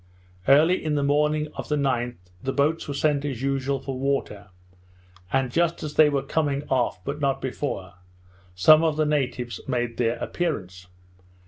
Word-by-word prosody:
Early 155 +7 +5
in 155 -1 0
the 145 - +1
morning 150 +2 +1
of - - -6
the 150 - +2
9th, 125 -4 0 0.3
the 135 - -2
boats 150 +4 0
were 145 - -3
sent 145 -1 +1
as 135 -4 -4
usual 135 0 0
for 135 -1 -5
water; 135 -7 -2 0.8
and 135 -2 +1
just 170 +2 0
as 150 -1 -4
they 155 -1 +6
were 140 -2 0
coming 145 0 -1
off, 125 -7 +1
but 140 +2 -4
not 135 -1 +1
before, 125 -9 -4 0.6
some 155 - +6
of 155 -2 +1
the 155 - +2
natives 130 -5 -2
made 120 -3 -2
their 120 -1 +1
appearance. 95 - -4
140 Hz, 165 wpm, -25 LUFS, 125-150 Hz, 0.8 s, they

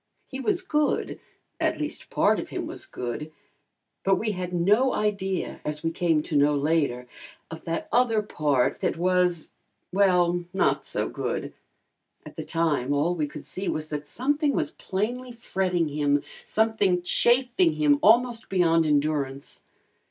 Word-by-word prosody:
He 265 - -7
was 370 +5 0
good 300 -4 0 0.4
at - - +1
least, - - -5
part - - +2
of - - -6
him - - -4
was 390 - -7
good; 140 - -5 0.7
but 195 0 +4
we 220 -1 -1
had 180 -2 -4
no 205 +9 +3
idea, 195 -3 -2
as 150 0 -4
we 165 - 0
came 165 -3 +1
to 155 - -4
know 145 +1 +4
later, 140 -4 0 0.5
of 160 - -9
that 165 0 -3
other 230 -3 +3
part 145 -9 0
that - - -1
was, 180 -1 +1 0.4
well 180 -3 +3
not - - +1
so - - -2
good. - - -4 0.7
At - - -11
the - - -5
time 150 -5 0
all 145 +5 +2
we 155 -4 -1
could 150 0 -10
see 190 +1 -4
was 155 0 -3
that 150 -1 -5
something 290 - 0
was - - 0
plainly 245 +6 -3
fretting 185 -7 -1
him, 145 -1 +1 0.2
something 210 -5 +1
chafing 240 -4 +3
him 150 -2 +3
almost 235 +1 +3
beyond 165 -4 +3
endurance. 145 -2 -1
175 Hz, 150 wpm, -26 LUFS, 150-215 Hz, 0.7 s, but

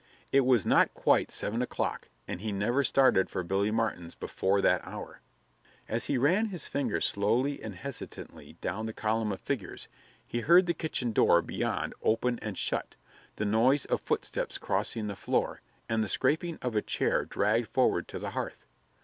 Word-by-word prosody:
It 135 -2 +4
was 125 -7 +4
not - - +4
quite - - +3
seven 115 +4 -1
o'clock, 125 - -2 0.2
and 90 - -5
he 110 0 -2
never 115 +8 +1
started 130 -9 +4
for 90 - -3
Billy 95 +4 +1
Martin's 110 -6 -2
before 95 +1 0
that - - +3
hour. - - -8 0.7
As 115 +2 -1
he 140 - 0
ran 180 - +3
his 185 -5 -5
finger 135 -6 -1
slowly 120 +8 +1
and 110 -3 -6
hesitatingly 140 +6 -8
down 110 +5 -2
the 110 - -5
column 110 0 0
of 95 - -4
figures, 120 -11 -3 0.4
he 120 - -3
heard 175 +9 +6
the 170 - +1
kitchen 130 -8 -2
door 85 -5 +4
beyond - - -2
open 120 +2 +1
and 105 -4 -5
shut, - - -1 0.4
the 105 - -2
noise 120 +7 +3
of - - 0
footsteps - - -2
crossing 110 -2 -1
the 100 -1 -4
floor - - -1 0.3
and 110 -1 +1
the 105 - -3
scraping 160 - +1
of 125 -3 -2
a 105 - +3
chair - - 0
dragged 110 +3 +1
forward - - +2
to - - -6
the - - -4
hearth. - - -5
115 Hz, 175 wpm, -30 LUFS, 105-135 Hz, 0.7 s, heard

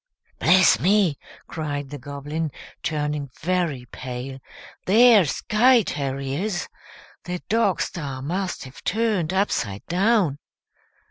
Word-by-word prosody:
"Bless 185 -1 +5
me!" 185 -4 +2 0.3
cried 145 -3 -4
the 145 - -6
Goblin, 145 +4 -4 0.3
turning 150 -2 -2
very 170 -7 -1
pale, 130 +1 -6 0.5
"they're 220 -1 +7
sky 230 - +3
terriers. 140 +7 -3 0.6
The 180 0 -3
dog 215 -3 +2
star 140 -6 -4
must 185 +5 -3
have 130 0 -12
turned 210 -6 0
upside 125 - -1
down." 185 -5 +2
165 Hz, 105 wpm, -23 LUFS, 140-195 Hz, 0.6 s, they're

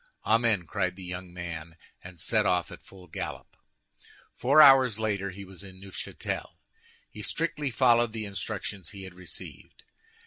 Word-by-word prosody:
"Amen!" 110 -5 +3
cried 95 0 -1
the 95 - -10
young 90 0 -6
man, 85 -2 -6 0.3
and 90 -1 -11
set 110 +4 +2
off 90 -1 +1
at - - -10
full 95 -2 -15
gallop. 85 - -6 0.8
Four 140 +5 +4
hours 135 -6 +8
later 100 -3 -1
he 100 +1 -8
was 95 0 -10
in 95 -1 -11
Neufchâtel. 95 -1 -5 0.6
He 105 - -8
strictly 150 +4 -1
followed 120 -2 +4
the 110 -1 -4
instructions 100 -1 -5
he 100 -3 -9
had 95 -1 -9
received. 90 0 -9
100 Hz, 150 wpm, -28 LUFS, 90-115 Hz, 0.8 s, hours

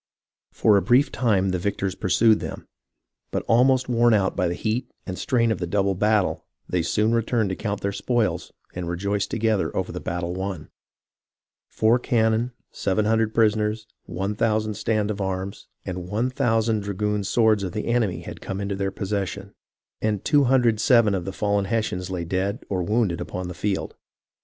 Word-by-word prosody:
For 105 -2 +4
a - - +3
brief 125 +9 +3
time 100 -6 +1
the 90 -1 -1
victors 95 0 -2
pursued 110 +3 +3
them, - - -6 0.6
but - - -2
almost 130 +2 +4
worn 120 -1 +4
out 95 -2 +1
by 90 -2 +1
the 85 - -2
heat 115 +6 -2 0.2
and 95 - -4
strain 115 +2 +1
of 110 - -1
the 90 - -2
double 100 +2 +1
battle, 105 +1 +1 0.2
they 90 - 0
soon 105 +7 +1
returned 115 -2 +1
to - - -2
count 105 0 -3
their 100 - -1
spoils 105 -4 -1 0.2
and 90 0 -4
to - - -4
rejoice 100 +3 -1
together 110 -3 0
over - - -2
the - - -5
battle 85 0 -3
won. 95 -4 -5 1.0
Four 115 +3 +3
cannon, 115 0 +1 0.2
700 110 +2 +1
prisoners, 110 -1 +2 0.2
1000 105 +4 -1
stand 105 0 0
of 100 - -5
arms, 95 0 -4 0.2
and 90 -1 -5
1000 115 0 +1
dragoon 105 +1 -2
swords 110 +1 +3
of 95 -3 -4
the 105 - -3
enemy 115 -6 0
had - - -9
come 95 - -4
into 100 0 -2
their 95 0 -1
possession; 100 0 -4 0.5
and 105 -3 -1
207 120 -5 +4
of 90 -3 -2
the 95 - -3
fallen 100 0 0
Hessians 95 -4 -2
lay 90 -2 -3
dead 95 +6 -2
or 95 -2 -1
wounded 105 -1 0
upon 90 0 -5
the - - -5
field. 95 +2 -2
105 Hz, 170 wpm, -24 LUFS, 95-115 Hz, 1.0 s, For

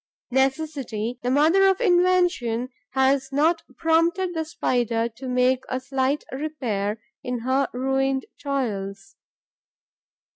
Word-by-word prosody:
Necessity, 265 -4 -1
the 245 - -1
mother 320 +9 +5
of 385 - +1
invention, 355 - +2 0.2
has 270 +1 +2
not 320 +4 +2 0.2
prompted 335 +3 +2
the 320 -1 -1
Spider 240 -6 0
to 245 +4 -9
make 250 +1 +2
a 255 - -1
slight 265 +2 -1
repair 240 -8 -2 0.2
in 250 -1 -3
her 260 +3 +1
ruined 270 +1 0 0.2
toils. 225 - -3
265 Hz, 110 wpm, -24 LUFS, 245-315 Hz, 0.2 s, mother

